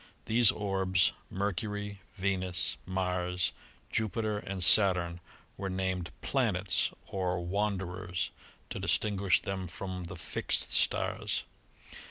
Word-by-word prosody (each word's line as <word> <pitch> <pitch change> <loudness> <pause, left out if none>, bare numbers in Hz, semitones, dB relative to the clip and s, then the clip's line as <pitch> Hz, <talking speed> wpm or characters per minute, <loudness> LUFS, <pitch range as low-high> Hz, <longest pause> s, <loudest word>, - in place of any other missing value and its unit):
These 115 0 +6
orbs, 95 -2 +2 0.2
Mercury, 100 +1 -3
Venus, 95 -3 0
Mars, 90 -1 0 0.4
Jupiter 110 -1 0
and 95 -3 -2
Saturn, 90 -4 +5 0.4
were 95 - -3
named 95 -2 -1
"planets" 100 -9 +2 0.2
or 90 -2 -1
"wanderers" 90 -3 -1 0.4
to - - -3
distin 105 -1 +1
guish 95 -1 +3
them 95 -1 -3
from 90 +1 -5
the 85 +3 -7
"fixed" 85 - 0
stars. - - +1
95 Hz, 105 wpm, -31 LUFS, 90-100 Hz, 0.4 s, These